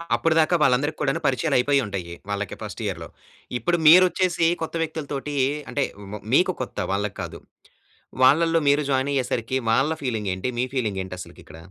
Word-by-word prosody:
అప్పుడు 165 Hz, -, +1 dB
దాకా 160 Hz, +2 st, +3 dB
వాళ్ళందరికీ 145 Hz, +3 st, +2 dB
కూడాను 135 Hz, +3 st, 0 dB
పరిచయాలు 130 Hz, -3 st, 0 dB
అయిపోయి 140 Hz, +3 st, +3 dB
ఉంటాయి 95 Hz, -4 st, -5 dB, 0.2 s
వాళ్ళకి 100 Hz, -1 st, -3 dB
ఫస్ట్ 105 Hz, +2 st, -7 dB
ఇయర్‌లో. 85 Hz, -5 st, -4 dB, 0.5 s
ఇప్పుడు 175 Hz, +4 st, +1 dB
మీరొచ్చేసి 175 Hz, 0 st, +5 dB
కొత్త 160 Hz, -, -4 dB
వ్యక్తుల 160 Hz, -1 st, -5 dB
తోటీ 145 Hz, +1 st, -4 dB, 0.4 s
అంటే 140 Hz, -, 0 dB, 0.3 s
వ్ 105 Hz, -, -6 dB
మీకు 185 Hz, +5 st, +4 dB
కొత్త 130 Hz, -, -6 dB
వాళ్ళకి 100 Hz, +1 st, -2 dB
కాదు. -, -, -7 dB, 0.8 s
వాళ్ళల్లో 165 Hz, +5 st, +5 dB
మీరు 145 Hz, +1 st, +4 dB
జాయిన్ 135 Hz, +1 st, +1 dB
అయ్యేసరికి 130 Hz, -2 st, -1 dB
వాళ్ళ 135 Hz, +7 st, +2 dB
ఫీలింగేంటి? 105 Hz, -6 st, -2 dB
మీ -, -, +2 dB
ఫీలింగేంటి 95 Hz, -7 st, -2 dB
అసలకి -, -, -11 dB
ఇక్కడ? 80 Hz, -, -13 dB
135 Hz, 160 wpm, -23 LUFS, 105-155 Hz, 0.8 s, మీరొచ్చేసి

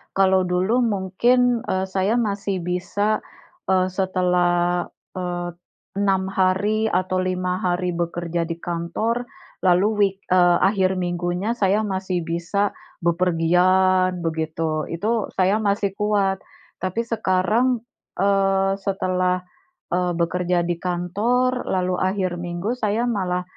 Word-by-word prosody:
Kalau 190 Hz, -1 st, +3 dB
dulu 185 Hz, +7 st, +1 dB
mungkin, 235 Hz, +3 st, +2 dB
eee, 190 Hz, 0 st, 0 dB
saya 190 Hz, +3 st, 0 dB
masih 200 Hz, -5 st, -1 dB
bisa, 195 Hz, +4 st, 0 dB, 0.5 s
eee, 185 Hz, -1 st, +2 dB
setelah, 180 Hz, -2 st, +1 dB, 0.3 s
eee, 175 Hz, -1 st, -3 dB, 0.5 s
6 190 Hz, -1 st, +1 dB
hari 200 Hz, +4 st, +1 dB
atau 185 Hz, -1 st, 0 dB
5 185 Hz, 0 st, -1 dB
hari 180 Hz, 0 st, 0 dB
bekerja 170 Hz, 0 st, -2 dB
di 165 Hz, -, -3 dB
kantor, 175 Hz, +9 st, -2 dB, 0.3 s
lalu 180 Hz, +1 st, +3 dB
week 195 Hz, -1 st, +2 dB
eee, 175 Hz, -1 st, +5 dB
akhir 190 Hz, -1 st, +2 dB
minggunya 175 Hz, +3 st, -1 dB
saya 210 Hz, -2 st, +1 dB
masih 190 Hz, -3 st, -2 dB
bisa 170 Hz, +5 st, -1 dB, 0.3 s
bepergian 180 Hz, +1 st, +2 dB
begitu, 160 Hz, -1 st, -2 dB
itu 215 Hz, +6 st, -1 dB
saya 190 Hz, +3 st, +2 dB
masih 200 Hz, -1 st, 0 dB
kuat. 200 Hz, -2 st, +1 dB, 0.4 s
Tapi 185 Hz, +5 st, -2 dB
sekarang, 225 Hz, +3 st, +1 dB, 0.4 s
eee, 195 Hz, 0 st, +2 dB
setelah, 185 Hz, -2 st, 0 dB, 0.5 s
eee, 180 Hz, 0 st, +1 dB
bekerja 175 Hz, +1 st, 0 dB
di 170 Hz, 0 st, -2 dB
kantor, 210 Hz, +9 st, 0 dB
lalu 185 Hz, -1 st, 0 dB
akhir 185 Hz, -2 st, -1 dB
minggu 175 Hz, +4 st, -3 dB
saya 215 Hz, 0 st, 0 dB
malah, 180 Hz, -4 st, -1 dB
185 Hz, 115 wpm, -22 LUFS, 175-200 Hz, 0.5 s, eee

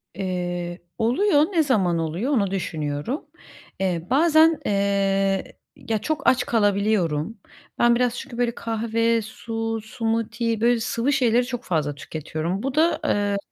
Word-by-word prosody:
Eee, 175 Hz, -2 st, -3 dB, 0.2 s
oluyor, 290 Hz, -, +3 dB
ne 335 Hz, -4 st, +3 dB
zaman 195 Hz, -, +2 dB
oluyor, 165 Hz, -, -2 dB
onu 200 Hz, -7 st, +1 dB
düşünüyorum. 160 Hz, -, -3 dB, 0.5 s
Eee, 180 Hz, -3 st, -1 dB
bazen, 315 Hz, +3 st, +5 dB
eee, 195 Hz, -1 st, +1 dB, 0.2 s
ya, 250 Hz, -6 st, -2 dB
çok 310 Hz, +8 st, -3 dB
aç 255 Hz, -1 st, +4 dB
kalabiliyorum. 205 Hz, -4 st, +1 dB, 0.4 s
Ben 240 Hz, 0 st, +5 dB
biraz 245 Hz, 0 st, +1 dB
çünkü 260 Hz, -2 st, -8 dB
böyle 240 Hz, -1 st, 0 dB
kahve, 230 Hz, 0 st, 0 dB
su, 225 Hz, +1 st, -4 dB
smoothie, 230 Hz, 0 st, -2 dB
böyle 240 Hz, 0 st, +3 dB
sıvı 235 Hz, +5 st, 0 dB
şeyleri 245 Hz, -2 st, +3 dB
çok 245 Hz, -1 st, -5 dB
fazla 150 Hz, -4 st, -1 dB
tüketiyorum. 155 Hz, +6 st, -4 dB
Bu 270 Hz, 0 st, -2 dB
da, 325 Hz, +2 st, +3 dB
ııı, 205 Hz, -1 st, +1 dB
225 Hz, 135 wpm, -23 LUFS, 190-245 Hz, 0.5 s, bazen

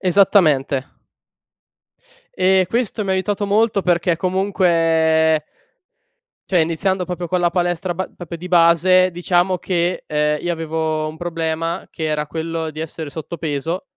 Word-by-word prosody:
Esattamente. 165 Hz, -8 st, +3 dB, 1.5 s
E 185 Hz, 0 st, +3 dB
questo 230 Hz, -1 st, -1 dB
mi 195 Hz, -, -2 dB
ha -, -, +3 dB
aiutato 200 Hz, +2 st, -1 dB
molto, 205 Hz, 0 st, +2 dB
perché 175 Hz, -1 st, +1 dB
comunque 165 Hz, -4 st, +2 dB, 1.1 s
cioè 180 Hz, -3 st, +3 dB
iniziando 180 Hz, +4 st, 0 dB
proprio 180 Hz, -1 st, -4 dB
con 180 Hz, +1 st, -1 dB
la 175 Hz, -1 st, +2 dB
palestra 175 Hz, 0 st, -1 dB
ba 185 Hz, +2 st, -4 dB
proprio 170 Hz, -1 st, -7 dB
di 175 Hz, +2 st, -8 dB
base, 180 Hz, +1 st, +4 dB
diciamo 175 Hz, +1 st, +1 dB
che, 175 Hz, 0 st, -1 dB
ehm, 150 Hz, 0 st, 0 dB
io 175 Hz, -, -1 dB
avevo 160 Hz, -1 st, -2 dB
un 155 Hz, -, -8 dB
problema, 165 Hz, 0 st, -3 dB
che 160 Hz, -, -6 dB
era 150 Hz, -1 st, -1 dB
quello 165 Hz, 0 st, -4 dB
di 155 Hz, -, -11 dB
essere 160 Hz, -1 st, -6 dB
sottopeso 160 Hz, +1 st, -4 dB
170 Hz, 135 wpm, -19 LUFS, 160-185 Hz, 1.5 s, base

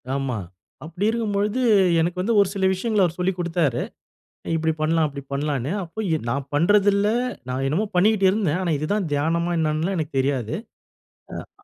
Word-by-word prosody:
ஆமா. 135 Hz, -4 st, -2 dB, 0.5 s
அப்படி 175 Hz, +6 st, -3 dB
இருக்கும்பொழுது 215 Hz, +1 st, -1 dB, 0.4 s
எனக்கு 175 Hz, +2 st, -1 dB
வந்து 225 Hz, +5 st, 0 dB
ஒரு 200 Hz, -, +2 dB
சில 195 Hz, -2 st, 0 dB
விஷயங்கள 210 Hz, +2 st, 0 dB
அவர் 170 Hz, -1 st, 0 dB
சொல்லிக் 180 Hz, 0 st, -1 dB
கொடுத்தாரு. 165 Hz, -7 st, 0 dB, 0.8 s
இப்படி 160 Hz, 0 st, 0 dB
பண்ணலாம், 160 Hz, 0 st, +2 dB
அப்படி 140 Hz, -1 st, -8 dB
பண்ணலாம்ன்னு. 140 Hz, 0 st, -1 dB
அப்போ 170 Hz, +6 st, -7 dB, 0.3 s
நான் 140 Hz, +3 st, -1 dB
பண்ணுறதில்ல. 200 Hz, +5 st, +3 dB, 0.4 s
நான் 130 Hz, +1 st, -2 dB
என்னமோ 170 Hz, +11 st, 0 dB
பண்ணிக்கிட்டுருந்தேன். 190 Hz, -3 st, +3 dB
ஆனா 175 Hz, -, -1 dB
இதுதான் 185 Hz, +5 st, -1 dB
தியானமா 165 Hz, +4 st, 0 dB
என்னன்னுலாம் 160 Hz, +4 st, 0 dB
எனக்கு 155 Hz, -1 st, -3 dB
தெரியாது. 130 Hz, -4 st, -1 dB, 1.1 s
அ -, -, -28 dB
170 Hz, 145 wpm, -23 LUFS, 150-200 Hz, 1.1 s, பண்ணுறதில்ல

